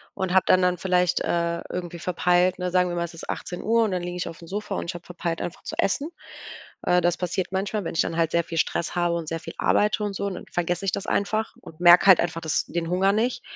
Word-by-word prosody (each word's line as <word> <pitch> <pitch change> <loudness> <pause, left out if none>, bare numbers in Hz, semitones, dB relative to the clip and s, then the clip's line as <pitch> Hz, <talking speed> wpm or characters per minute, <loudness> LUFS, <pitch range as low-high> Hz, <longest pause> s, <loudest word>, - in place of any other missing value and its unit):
Und 190 -1 -2
habe 190 - +5
dann 185 - +5
dann 180 0 +2
vielleicht, 180 -1 +2
äh, 170 0 -1
irgendwie 175 -1 -5
verpeilt, 180 +1 +2
ne 180 0 -3
sagen 180 0 +3
wir 175 - -3
mal, 170 - -1
es 170 +1 -6
ist 165 - -10
18:00, 225 +6 0
und 215 - 0
dann 180 -1 -1
liege 175 0 -5
ich 180 - -3
aufm 165 0 -10
Sofa 205 +2 -4
und - - -3
ich - - -3
habe 175 - -9
verpeilt, 170 -2 -4
einfach 175 - -5
zu - - -6
essen. 280 +10 0 0.7
Äh, 180 - +3
das 175 0 +1
passiert 180 +1 -2
manchmal, 195 +2 -2
wenn - - -4
ich - - +3
dann 165 - -4
halt 165 -1 +1
sehr 170 0 +2
viel 165 - -4
Stress 165 - -1
habe 175 -1 +1
und 165 -2 -5
sehr 165 +1 -3
viel - - -9
arbeite 210 0 +2
und 205 -1 -3
so 200 - -3
und 195 - -3
dann - - -8
vergesse 175 +1 -1
ich 195 - 0
das 195 - -3
einfach 215 +2 -1
und 155 - -14
merke 175 0 +8
halt 190 -3 +8
einfach 170 -1 -2
das 160 - 0
den 170 -1 -3
Hunger 190 +2 +3
nicht. 235 +4 0
180 Hz, 265 wpm, -25 LUFS, 170-190 Hz, 0.7 s, merke